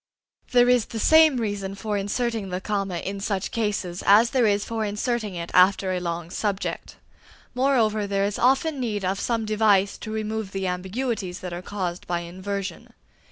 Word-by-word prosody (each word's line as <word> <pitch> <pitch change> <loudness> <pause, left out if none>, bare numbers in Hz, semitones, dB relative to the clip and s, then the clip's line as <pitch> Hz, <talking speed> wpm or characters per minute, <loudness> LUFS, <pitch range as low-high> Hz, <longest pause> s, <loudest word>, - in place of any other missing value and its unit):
There 245 -1 +5
is 250 -3 +4
the 230 - -7
same 315 +1 +6
reason 205 -4 -3
for 210 +1 -3
inserting 210 +1 -2
the 180 0 -3
comma 195 -2 -2
in 195 +3 -4
such 195 -1 -2
cases 200 -5 -2
as 220 +4 +6
there 250 -4 +3
is 205 0 +1
for 225 -1 -2
inserting 210 0 -2
it 170 0 -5
after 185 +1 +4
a 180 - -1
long 170 -1 -4
subject. 200 -1 -3 0.6
Moreover, 235 -5 +2
there 195 0 +1
is 205 +1 -2
often 270 +4 +2
need 210 -6 -2
of 190 +2 -1
some 230 -2 -1
device 210 -2 +2
to 215 - -7
remove 220 -2 -3
the 195 -1 -2
ambiguities 190 +1 -3
that 180 -1 -5
are 175 - -5
caused 185 -3 -4
by 175 -1 -1
inversion. 185 +1 -6
205 Hz, 175 wpm, -24 LUFS, 190-225 Hz, 0.6 s, same